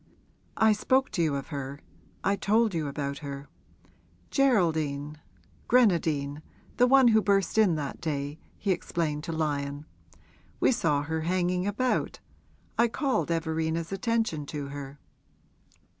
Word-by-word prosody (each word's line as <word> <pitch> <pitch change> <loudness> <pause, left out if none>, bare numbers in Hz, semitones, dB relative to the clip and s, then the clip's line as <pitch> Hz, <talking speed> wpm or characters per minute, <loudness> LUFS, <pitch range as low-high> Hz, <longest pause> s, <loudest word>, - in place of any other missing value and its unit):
I 220 0 +5
spoke 260 +5 +1
to 175 - -1
you 155 -4 +1
of 140 +2 -5
her 140 -2 -5 0.4
I 200 - +2
told 215 +2 +2
you 160 -3 -1
about 140 0 -4
her. 140 -1 -7 0.8
Geraldine 155 - +1 0.5
Grenadine 160 - +2 0.4
the 250 - +5
one 265 -1 +6
who 220 -1 +5
burst 195 -3 +1
in 210 -6 +4
that 145 -3 -5
day,' 145 -1 -3 0.2
he 200 - -1
explained 155 -4 -2
to 170 - -4
Lyon. 145 -2 -2 0.7
'We - - +4
saw 155 - +1
her 160 +1 -2
hanging 180 +2 0
about 250 +5 0 0.6
I 235 - +6
called 235 - -1
Everina's 160 0 -1
attention 195 -8 -1
to 145 -2 -5
her.' 140 0 -7
160 Hz, 130 wpm, -28 LUFS, 145-205 Hz, 0.8 s, one